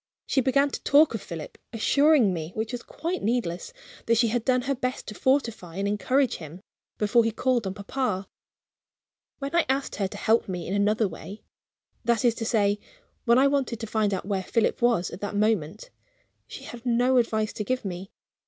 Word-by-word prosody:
She 265 - +2
began 275 +2 +2
to - - -5
talk 290 0 +5
of 225 - -3
Philip; 165 -3 -8
assuring 270 -1 +4
me 160 0 -5
(which 220 +1 -2
was 245 -1 -4
quite 340 +8 -4
needless) 210 - -1 0.4
that 230 0 +4
she 230 0 +3
had 235 0 -1
done 255 -1 +2
her 275 +2 0
best 255 -1 -3
to 210 - -7
fortify 230 - 0
and 200 +1 -1
encourage 255 +6 +1
him, 160 +2 -10 0.4
before 220 +3 +3
he 225 - +1
called 240 -1 0
on 190 - -4
papa. 200 -2 -2 1.1
When 280 +3 -4
I 340 - +5
asked 270 +1 -1
her 195 - 0
to 205 - -9
help 220 0 +2
me 180 -3 -4
in 185 - -3
another 210 +2 +2
way 200 +3 -9 0.6
that 235 -1 +1
is 235 - +5
to 225 - -5
say, 205 -3 +2 0.5
when 235 0 +5
I 265 - +5
wanted 275 -5 0
to 225 - -4
find 215 -1 0
out 190 - -2
where 195 -1 -1
Philip 220 +6 0
was 235 -7 +2
at 180 - -9
that 205 0 -4
moment 210 - 0 0.6
she - - -9
had 235 -1 -9
no 250 +1 +3
advice 220 -2 +1
to 210 - -3
give 255 +1 -2
me. 185 0 -5
225 Hz, 200 wpm, -26 LUFS, 200-255 Hz, 1.1 s, talk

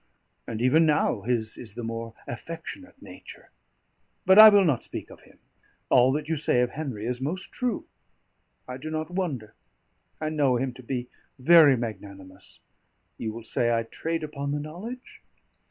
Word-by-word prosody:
And 115 +1 -4
even 155 +6 +4
now 145 -7 +1
his 110 0 -2
is 110 -3 -9
the 120 - -6
more 115 0 -5
affectionate 165 - -8
nature. - - -13 0.7
But 190 +2 +7
I 220 0 +13
will 205 -2 +5
not 140 -8 +1
speak - - -8
of - - -14
him. - - -21 0.5
All 125 +1 +5
that 150 +1 -3
you 160 0 -1
say 125 -4 +1
of 125 0 0
Henry 130 -8 -5
is 125 +1 -3
most 170 +7 -4
true; 245 -4 -3 0.8
I 125 - -6
do 155 +4 -7
not 155 +2 -4
wonder, 155 - -3 0.7
I 155 - -2
know 145 -5 +2
him 130 +1 -2
to 130 - -12
be 125 0 -4 0.3
very 145 0 +6
magnanimous; 100 -4 -9 0.6
you 110 - -3
will 115 +1 -9
say 120 +1 0
I 115 0 +1
trade 165 +8 -4
upon 140 -2 -4
the 145 - -1
knowledge? 195 - -9
135 Hz, 170 wpm, -26 LUFS, 115-160 Hz, 0.8 s, I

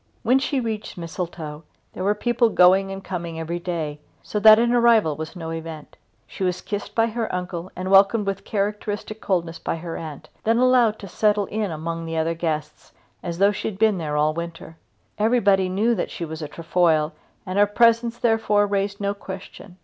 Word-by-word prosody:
When 255 +3 +4
she 275 0 -1
reached 220 -5 -4
Mistletoe 165 -3 -6 0.3
there 185 - -5
were 205 +2 +2
people 240 +2 +2
going 190 0 +5
and 195 0 -6
coming 170 -3 -5
every 170 +2 -3
day, 160 -4 -4 0.2
so 210 - -3
that 215 +1 +9
an 235 +1 +2
arrival 230 -10 +4
was 160 +3 -7
no 165 -2 -6
event. 160 -2 -7 0.3
She - - -6
was 180 -1 0
kissed 205 +1 -5
by 225 - +4
her 230 0 -3
uncle 180 -1 -4
and 185 +1 -4
welcomed 200 +2 +5
with 195 0 -3
characteristic 210 +1 -3
coldness 170 -4 -1
by - - -2
her 165 0 -6
aunt, 155 -1 -8 0.2
then 225 +1 +2
allowed 245 -3 +4
to 200 - -7
settle 210 +2 +1
in 210 0 -2
among 165 +1 -4
the 165 0 -3
other 160 +1 +1
guests 155 -2 -4 0.3
as 170 -2 -5
though 200 +2 +4
she 205 - -4
had 205 - -5
been 215 -3 +3
there 150 -2 -2
all 150 +1 +2
the 165 - -4
winter. 170 -1 -8 0.4
Everybody 205 -4 +3
knew 210 +6 +2
that 195 - -2
she 170 - -5
was 160 0 -7
a 150 - -4
Trefoil 165 -1 +1 0.3
and 190 +1 -1
her 205 - +5
presence 230 +2 +3
therefore 220 -3 +2
raised 200 0 -1
no 200 0 0
question. 195 -1 -10
190 Hz, 195 wpm, -23 LUFS, 165-215 Hz, 0.4 s, that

